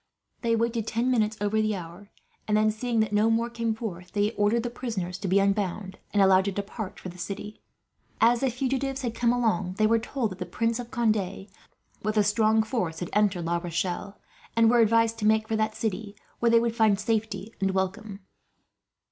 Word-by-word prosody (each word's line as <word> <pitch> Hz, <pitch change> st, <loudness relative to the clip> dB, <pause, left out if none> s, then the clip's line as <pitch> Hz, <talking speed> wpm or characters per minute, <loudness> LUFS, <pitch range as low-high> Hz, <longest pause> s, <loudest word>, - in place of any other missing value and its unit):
They 230 Hz, -1 st, +2 dB
waited 230 Hz, -1 st, -1 dB
ten 240 Hz, +3 st, 0 dB
minutes 220 Hz, -3 st, +1 dB
over 205 Hz, +1 st, +1 dB
the 215 Hz, -1 st, 0 dB
hour; 180 Hz, +3 st, -9 dB, 0.4 s
and 210 Hz, 0 st, +2 dB
then, 215 Hz, 0 st, +3 dB
seeing 230 Hz, +1 st, 0 dB
that 215 Hz, -1 st, -1 dB
no 210 Hz, +2 st, +3 dB
more 230 Hz, +1 st, +1 dB
came 230 Hz, -1 st, -1 dB
forth, 185 Hz, -6 st, -7 dB
they 205 Hz, 0 st, +1 dB
ordered 215 Hz, +2 st, +1 dB
the 240 Hz, -, -3 dB
prisoners 190 Hz, -8 st, -4 dB
to 195 Hz, -, -3 dB
be 190 Hz, +2 st, +3 dB
unbound, 195 Hz, -1 st, 0 dB
and 205 Hz, -1 st, +4 dB
allowed 190 Hz, 0 st, +5 dB
to 200 Hz, -, 0 dB
depart 200 Hz, +1 st, -5 dB
for 185 Hz, -, -7 dB
the 180 Hz, +1 st, -12 dB
city. 205 Hz, +4 st, -6 dB, 0.6 s
As 235 Hz, +1 st, +4 dB
the 270 Hz, -, +1 dB
fugitives 270 Hz, +2 st, -2 dB
had 235 Hz, -2 st, -2 dB
come 235 Hz, 0 st, +2 dB
along 220 Hz, -7 st, 0 dB
they 215 Hz, -, +3 dB
were 225 Hz, +1 st, +4 dB
told 235 Hz, -1 st, -2 dB
that 185 Hz, -, -9 dB
the 180 Hz, -, -4 dB
Prince 230 Hz, +5 st, -1 dB
of 240 Hz, -1 st, -6 dB
Conde, 215 Hz, -6 st, 0 dB, 0.6 s
with 215 Hz, +1 st, -1 dB
a 210 Hz, -, +5 dB
strong 220 Hz, +1 st, +3 dB
force, 215 Hz, -9 st, -2 dB
had 175 Hz, -, -5 dB
entered 200 Hz, -5 st, +2 dB
La 170 Hz, +1 st, +1 dB
Rochelle; 175 Hz, +3 st, -3 dB, 0.4 s
and 230 Hz, 0 st, +5 dB
were 240 Hz, -, +4 dB
advised 230 Hz, 0 st, +3 dB
to 210 Hz, -, +1 dB
make 220 Hz, 0 st, +3 dB
for 220 Hz, -, -1 dB
that 215 Hz, 0 st, 0 dB
city, 210 Hz, -1 st, -3 dB, 0.2 s
where 235 Hz, -, +3 dB
they 230 Hz, 0 st, +6 dB
would 230 Hz, 0 st, -1 dB
find 215 Hz, -4 st, +3 dB
safety 220 Hz, 0 st, -2 dB
and 195 Hz, -, +2 dB
welcome. 195 Hz, +2 st, -3 dB
215 Hz, 205 wpm, -27 LUFS, 195-230 Hz, 0.6 s, they